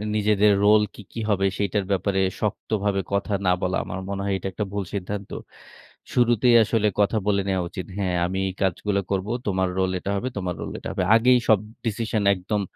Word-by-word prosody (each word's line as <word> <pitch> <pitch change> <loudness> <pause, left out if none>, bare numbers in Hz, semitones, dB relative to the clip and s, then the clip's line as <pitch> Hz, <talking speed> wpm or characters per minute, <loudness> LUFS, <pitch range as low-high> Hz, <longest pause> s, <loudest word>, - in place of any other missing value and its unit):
নিজেদের 105 0 +3
রোল 105 +1 +6
কি, - - -11
কি 115 - -5
হবে 100 -1 +2
সেটার 100 0 0
ব্যাপারে 95 0 +1 0.2
শক্তভাবে 105 -1 -1
কথা 100 +1 0
না 90 - +4
বলা। 90 0 0
আমার 95 - -5
মনে 100 0 -3
হয় 100 - 0
এটা 95 - -5
একটা 105 +3 -3
ভুল 100 - -1
সিদ্ধান্ত। 100 +1 -4 0.8
শুরুতেই 120 0 +4
আসলে 110 0 +1
কথা 100 +2 +2
বলে 100 -1 +2
নেয়া 95 -1 0
উচিত। 90 - -6
হ্যাঁ, 95 -3 0
আমি 95 +2 -3
এই 95 - -3
কাজগুলো 100 +2 0
করব। 95 +1 -1 0.2
তোমার 95 -1 +1
রোল 95 -1 +1
এটা 100 - -5
হবে, 100 +6 -2
তোমার 90 -3 -2
রোল - - -5
এটা - - -6
হবে। - - -1
আগেই 125 +2 +5
সব 110 -3 +6 0.3
ডিসিশন 110 -1 -1
একদম 100 +2 -2
100 Hz, 195 wpm, -24 LUFS, 95-105 Hz, 0.8 s, রোল